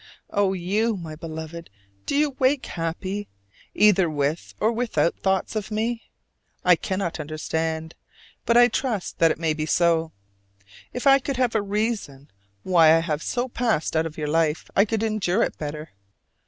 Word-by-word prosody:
Oh, 200 Hz, -2 st, +2 dB
you, 205 Hz, +5 st, 0 dB
my 160 Hz, -3 st, -7 dB
Beloved, 160 Hz, +1 st, -7 dB, 0.4 s
do -, -, 0 dB
you 295 Hz, 0 st, +2 dB
wake 260 Hz, +1 st, +2 dB
happy, 185 Hz, +5 st, -4 dB, 0.5 s
either 195 Hz, -5 st, +5 dB
with 150 Hz, +2 st, -2 dB
or 220 Hz, -, +2 dB
without 230 Hz, -7 st, 0 dB
thoughts 190 Hz, +2 st, 0 dB
of 215 Hz, -2 st, -3 dB
me? 225 Hz, +2 st, -2 dB, 0.6 s
I 180 Hz, -1 st, +7 dB
cannot 185 Hz, -1 st, -3 dB
understand, 160 Hz, +1 st, -3 dB, 0.5 s
but 235 Hz, -, +3 dB
I 240 Hz, 0 st, +8 dB
trust 235 Hz, -5 st, -3 dB
that 165 Hz, -, +5 dB
it -, -, -1 dB
may 160 Hz, -1 st, 0 dB
be 155 Hz, 0 st, -3 dB
so. 165 Hz, -1 st, +2 dB, 0.8 s
If 250 Hz, -, -5 dB
I 275 Hz, 0 st, +7 dB
could 270 Hz, -1 st, -4 dB
have 250 Hz, -2 st, +1 dB
a 220 Hz, -, +2 dB
reason 200 Hz, -, -3 dB, 0.3 s
why 165 Hz, -3 st, +6 dB
I -, -, +4 dB
have 160 Hz, -2 st, -2 dB
so 245 Hz, +6 st, -2 dB
passed 230 Hz, -11 st, -1 dB
out 160 Hz, +1 st, +2 dB
of 155 Hz, -, -11 dB
your 150 Hz, -1 st, -3 dB
life, 160 Hz, 0 st, 0 dB
I 200 Hz, -, +5 dB
could 220 Hz, 0 st, -2 dB
endure 215 Hz, -2 st, +1 dB
it -, -, -3 dB
better. 150 Hz, +1 st, -6 dB
185 Hz, 170 wpm, -24 LUFS, 160-220 Hz, 0.8 s, I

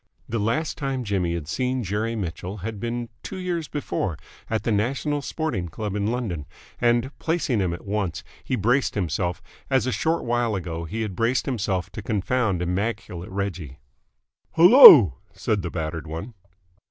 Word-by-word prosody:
The 115 Hz, -, -2 dB
last 145 Hz, +9 st, -1 dB
time 135 Hz, -3 st, -2 dB
Jimmy 95 Hz, -5 st, -1 dB
had 80 Hz, -4 st, -5 dB
seen 125 Hz, +7 st, -1 dB
Jerry 105 Hz, +4 st, -2 dB
Mitchell 95 Hz, 0 st, -5 dB
had 110 Hz, -2 st, -5 dB
been 120 Hz, +1 st, -3 dB
two 190 Hz, -, -7 dB
years 175 Hz, -4 st, -3 dB
before 95 Hz, -, -3 dB, 0.3 s
at 110 Hz, -1 st, -1 dB
the 115 Hz, -, 0 dB
National 135 Hz, +7 st, 0 dB
Sporting 130 Hz, -, -3 dB
Club 105 Hz, +4 st, -5 dB
in 105 Hz, 0 st, -1 dB
London, 105 Hz, -, -3 dB, 0.3 s
and, 120 Hz, +2 st, +2 dB
placing 160 Hz, -8 st, 0 dB
him 95 Hz, -3 st, 0 dB
at 85 Hz, -, -7 dB
once, 100 Hz, -3 st, -2 dB, 0.2 s
he 130 Hz, -, -1 dB
braced 125 Hz, +5 st, +1 dB
himself, 90 Hz, -2 st, -2 dB, 0.3 s
as 130 Hz, -2 st, +2 dB
a 130 Hz, -, 0 dB
short 165 Hz, +5 st, 0 dB
while 120 Hz, -2 st, 0 dB
ago 85 Hz, -3 st, -4 dB
he 110 Hz, +8 st, -3 dB
had 100 Hz, -4 st, -5 dB
braced 115 Hz, +5 st, +1 dB
himself 100 Hz, -7 st, -2 dB
to 110 Hz, -, -7 dB
confound 105 Hz, -2 st, 0 dB
immaculate 90 Hz, -1 st, -3 dB
Reggie. 95 Hz, -8 st, -4 dB, 0.8 s
"Hello!" 160 Hz, -, +10 dB, 0.2 s
said 105 Hz, -2 st, -1 dB
the 85 Hz, -, -4 dB
battered 80 Hz, -1 st, -4 dB
one. 85 Hz, +10 st, -6 dB
105 Hz, 165 wpm, -24 LUFS, 90-125 Hz, 0.8 s, Hello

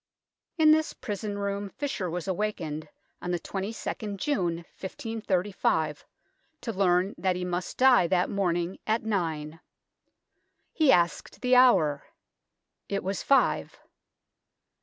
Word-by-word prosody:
In 310 Hz, -1 st, +6 dB
this 315 Hz, 0 st, +3 dB
prison 205 Hz, -2 st, -5 dB
room 200 Hz, 0 st, -3 dB
Fisher 270 Hz, -8 st, -3 dB
was 175 Hz, +2 st, -4 dB
awakened 170 Hz, -6 st, -3 dB, 0.3 s
on 180 Hz, -, -4 dB
the 175 Hz, -1 st, 0 dB
22nd 200 Hz, +2 st, -4 dB
June, 185 Hz, -, 0 dB, 0.2 s
1535, 190 Hz, -, -2 dB, 0.6 s
to 230 Hz, -, -4 dB
learn 185 Hz, 0 st, +2 dB
that 185 Hz, -1 st, +1 dB
he 180 Hz, 0 st, -3 dB
must 180 Hz, 0 st, -3 dB
die 255 Hz, -8 st, +6 dB
that 180 Hz, +1 st, +2 dB
morning 175 Hz, -2 st, -1 dB
at 220 Hz, +2 st, +1 dB
nine. 165 Hz, -7 st, -2 dB, 1.1 s
He 310 Hz, -4 st, +4 dB
asked 170 Hz, -4 st, +1 dB
the 250 Hz, 0 st, +3 dB
hour. 180 Hz, -, +5 dB, 0.9 s
It 200 Hz, 0 st, -2 dB
was 195 Hz, +1 st, -2 dB
five. 275 Hz, -, +2 dB
195 Hz, 115 wpm, -28 LUFS, 175-220 Hz, 1.1 s, In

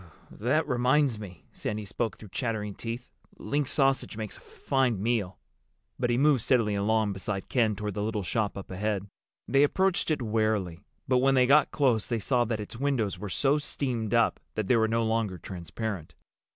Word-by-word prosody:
"That 130 Hz, +9 st, +1 dB
reminds 125 Hz, 0 st, +2 dB
me." 90 Hz, -6 st, -10 dB
Sandy 105 Hz, 0 st, -4 dB
spoke 110 Hz, +3 st, -3 dB
through 105 Hz, -, -12 dB
chattering 110 Hz, -2 st, -2 dB
teeth. 115 Hz, +4 st, -6 dB, 0.3 s
"Link 145 Hz, -1 st, -1 dB
sausage 135 Hz, -6 st, +1 dB
makes 110 Hz, -2 st, -5 dB
a -, -, -14 dB
fine 130 Hz, -6 st, 0 dB
meal." 105 Hz, -4 st, -1 dB, 0.6 s
But 120 Hz, -1 st, +1 dB
he 120 Hz, -, +2 dB
moved 140 Hz, -2 st, +4 dB
steadily 115 Hz, -3 st, +2 dB
along 105 Hz, +1 st, +1 dB
beside 95 Hz, 0 st, -4 dB
Ken 115 Hz, -4 st, +2 dB
toward 105 Hz, +1 st, -4 dB
the 105 Hz, -, -3 dB
little 105 Hz, -1 st, -1 dB
shop 105 Hz, +2 st, -1 dB
up 95 Hz, -, -8 dB
ahead. 100 Hz, +1 st, -1 dB, 0.4 s
They 135 Hz, -, +4 dB
approached 190 Hz, +6 st, +2 dB
it 150 Hz, -5 st, 0 dB
warily, 105 Hz, -6 st, 0 dB, 0.3 s
but 125 Hz, -1 st, +3 dB
when 135 Hz, +1 st, +3 dB
they 130 Hz, -1 st, +5 dB
got 145 Hz, +3 st, +5 dB
close 125 Hz, -7 st, +1 dB
they 120 Hz, -, 0 dB
saw 120 Hz, +3 st, +1 dB
that 110 Hz, -1 st, -2 dB
its 105 Hz, +2 st, -7 dB
windows 130 Hz, -8 st, 0 dB
were 105 Hz, -, -5 dB
so 140 Hz, +9 st, +2 dB
steamed 120 Hz, -6 st, -1 dB
up 115 Hz, -, +3 dB, 0.2 s
that 110 Hz, -, -1 dB
they 125 Hz, -, +3 dB
were 110 Hz, -1 st, +3 dB
no 115 Hz, +1 st, +1 dB
longer 110 Hz, -4 st, 0 dB
transparent. 90 Hz, +1 st, -6 dB
115 Hz, 185 wpm, -28 LUFS, 105-130 Hz, 0.6 s, they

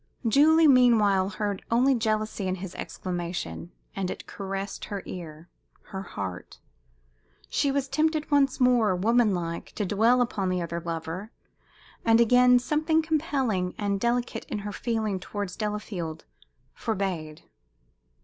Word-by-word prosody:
Julie, 315 Hz, +7 st, +6 dB
meanwhile, 220 Hz, -8 st, +5 dB
heard 205 Hz, 0 st, -3 dB
only 250 Hz, +4 st, +4 dB
jealousy 215 Hz, -4 st, -1 dB
in 185 Hz, -, 0 dB
his 185 Hz, -1 st, -7 dB
exclamation, 170 Hz, -, -5 dB, 0.2 s
and 190 Hz, -2 st, -2 dB
it -, -, -6 dB
caressed 195 Hz, 0 st, -5 dB
her 200 Hz, -2 st, -5 dB
ear, 165 Hz, -2 st, -8 dB, 0.4 s
her 195 Hz, -2 st, -7 dB
heart. 95 Hz, -, -6 dB, 0.9 s
She 280 Hz, -, +1 dB
was 275 Hz, 0 st, -1 dB
tempted 310 Hz, +1 st, 0 dB
once 280 Hz, -2 st, +3 dB
more, 240 Hz, -6 st, +4 dB
woman 220 Hz, +2 st, +3 dB
like, 170 Hz, -1 st, -5 dB
to 210 Hz, -, -2 dB
dwell 225 Hz, +6 st, +3 dB
upon 200 Hz, -6 st, -2 dB
the 185 Hz, 0 st, 0 dB
other 170 Hz, 0 st, -3 dB
lover, 165 Hz, +4 st, -5 dB, 0.7 s
and 225 Hz, 0 st, +5 dB
again 250 Hz, +1 st, +6 dB
something 310 Hz, +5 st, +1 dB
compelling 270 Hz, -, 0 dB
and 200 Hz, -1 st, -1 dB
delicate 240 Hz, +2 st, -1 dB
in -, -, -4 dB
her 205 Hz, -, -3 dB
feeling 215 Hz, -2 st, -2 dB
towards 195 Hz, 0 st, -5 dB
Delafield 210 Hz, -7 st, -4 dB, 0.5 s
forbade. 185 Hz, -8 st, -3 dB
210 Hz, 130 wpm, -27 LUFS, 185-245 Hz, 0.9 s, Julie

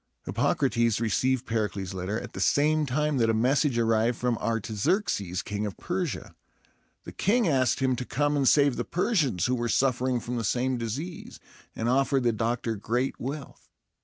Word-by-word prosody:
Hippocrates 115 Hz, -2 st, +1 dB
received 125 Hz, +3 st, +1 dB
Pericles' 100 Hz, -4 st, -2 dB
letter 95 Hz, +4 st, -3 dB
at -, -, -9 dB
the -, -, -6 dB
same 150 Hz, +1 st, +2 dB
time 150 Hz, +2 st, 0 dB
that 115 Hz, -1 st, +3 dB
a 110 Hz, -, +2 dB
message 130 Hz, +3 st, +2 dB
arrived 115 Hz, +1 st, +2 dB
from 125 Hz, -1 st, 0 dB
Artaxerxes, 110 Hz, -, -1 dB
King 105 Hz, +1 st, -3 dB
of 100 Hz, -, -7 dB
Persia. 175 Hz, -, -3 dB, 0.7 s
The -, -, -8 dB
king 225 Hz, +2 st, +1 dB
asked 130 Hz, -3 st, +2 dB
him 130 Hz, -1 st, +2 dB
to 125 Hz, -, -3 dB
come 145 Hz, +3 st, 0 dB
and 140 Hz, -3 st, +3 dB
save 140 Hz, -3 st, +4 dB
the -, -, -1 dB
Persians, 155 Hz, -, 0 dB
who 125 Hz, -, +1 dB
were 120 Hz, -1 st, -1 dB
suffering 130 Hz, +1 st, +1 dB
from 120 Hz, +1 st, -4 dB
the 115 Hz, -, -2 dB
same 125 Hz, +3 st, 0 dB
disease, 140 Hz, -, -5 dB, 0.4 s
and 115 Hz, -, -2 dB
offered 135 Hz, +1 st, +2 dB
the 120 Hz, -, +3 dB
doctor 115 Hz, +1 st, -1 dB
great 120 Hz, +6 st, -2 dB
wealth. 140 Hz, +3 st, -7 dB
125 Hz, 170 wpm, -27 LUFS, 115-140 Hz, 0.7 s, save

